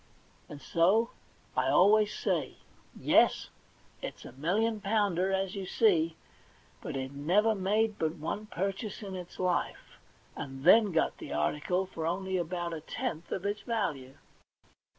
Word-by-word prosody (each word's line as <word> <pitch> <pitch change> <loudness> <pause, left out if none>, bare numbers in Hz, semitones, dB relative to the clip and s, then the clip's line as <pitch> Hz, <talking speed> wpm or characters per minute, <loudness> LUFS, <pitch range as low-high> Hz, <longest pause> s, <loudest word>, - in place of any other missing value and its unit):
And 145 - -8
so 190 - +2 0.4
I 130 +1 +2
always 205 +8 +5
say, 170 -10 -2 0.4
*Yes, - - +3 0.5
it's - - -7
a - - -9
million 205 - 0
pounder, 195 -3 +1
as 190 0 -1
you 195 -2 -5
see; 165 -8 +3 0.7
hut - - -5
it 130 0 -4
never 180 +11 +2
made 210 +2 0
but 160 0 0
one 205 +7 -4
purchase 195 +3 -3
in 195 -2 -6
its 180 -1 -8
life, 180 -1 -2 0.4
and 135 -1 -7
then 210 +4 +6
got 160 - 0
the - - -6
article 150 - 0
for 165 -3 -4
only 190 +2 -2
about 175 0 -3
a 160 - -5
tenth 160 +1 -4
part 190 - -3
of - - -11
its 205 +1 -1
value.' 160 - -3
185 Hz, 150 wpm, -30 LUFS, 160-205 Hz, 0.7 s, then